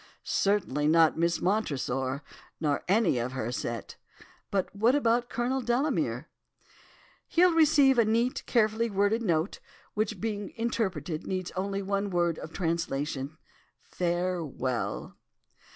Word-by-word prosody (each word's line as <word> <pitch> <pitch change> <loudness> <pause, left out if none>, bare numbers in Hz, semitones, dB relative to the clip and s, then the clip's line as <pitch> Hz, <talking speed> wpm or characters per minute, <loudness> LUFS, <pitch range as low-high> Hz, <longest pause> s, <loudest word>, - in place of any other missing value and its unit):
"'Certainly 185 -8 +1
not 160 0 +5
Miss 170 +1 +1
Montresor, 140 - -1 0.4
nor 150 -3 0
any 195 - +3
of 120 +2 -3
her 120 -3 -3
set. 120 -2 -4 0.5
But 195 0 -1
what 230 +6 +3
about 240 -3 +2
Colonel 255 +3 -1
Delamere?' 245 +5 0 1.0
"'He'll 355 +1 +4
receive 290 -5 +5
a - - +7
neat, 230 +3 +1
carefully 230 0 +2
worded 205 +3 +1
note, 170 -3 0 0.3
which 215 -1 -1
being 205 -2 -3
interpreted, 185 -9 -2
needs 185 -1 -3
only 195 +1 -2
one 200 +1 -1
word 175 -3 +1
of 160 - -8
translation, 155 -4 -2 0.5
"farewell." 170 -8 -2
190 Hz, 120 wpm, -29 LUFS, 155-225 Hz, 1.0 s, a